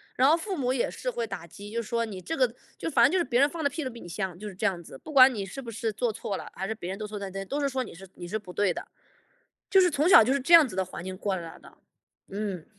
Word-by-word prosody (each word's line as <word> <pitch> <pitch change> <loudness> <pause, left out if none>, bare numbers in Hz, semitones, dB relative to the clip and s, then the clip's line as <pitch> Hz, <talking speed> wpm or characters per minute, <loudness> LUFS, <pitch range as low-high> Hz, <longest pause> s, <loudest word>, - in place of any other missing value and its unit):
然 260 +3 +5
后 325 - +5
父 380 +3 -4
母 255 -4 0
也 255 - 0
是 - - -4
会 480 -1 -2
打 - - -7
击， 205 +1 -11
就 235 +1 -1
说 230 +1 -1
你 195 -4 -7
这 325 - -4
个 - - +2 0.2
就 - - -4
反 - - +5
正 - - +4
就 375 - +2
是 345 - +2
别 245 -4 +1
人 285 +1 +5
放 330 -1 -5
的 285 - +3
屁 315 +3 -4
都 260 - -3
比 235 -1 -11
你 - - -10
香， 185 -1 -4
就 210 +2 -7
是 200 - -7
这 180 - 0
样 175 -3 -2
子， 135 - -12
不 310 - -10
管 260 -2 +8
你 205 -3 -3
是 195 +8 -8
不 235 -3 -7
是 220 +1 -2
做 225 +1 -1
错 200 -3 -4
了， - - -8
还 190 +1 -4
是 220 - -3
别 185 -4 -6
人 195 - -6
都 210 - -4
错 210 0 -6
在 200 -1 -5
这， 195 0 -4
都 285 +8 -3
是 280 - +1
说 260 -1 -1
你 - - -11
是 195 +2 -12
你 175 -1 -9
是 215 - -2
不 185 -4 -11
对 205 -3 +2
的。 - - -6 0.8
就 385 - +6
是 360 -2 +5
从 295 +5 +2
小 230 - +9
就 255 +4 +2
是 280 - +1
这 305 +6 +7
样 310 -5 +7
子 190 - -9
的 190 - +1
环 180 -1 -8
境 185 0 -5
过 195 0 -2
来 165 -2 -8
的， - - -17 0.5
嗯。 195 -4 -4
220 Hz, 355 characters per minute, -27 LUFS, 195-275 Hz, 0.8 s, 小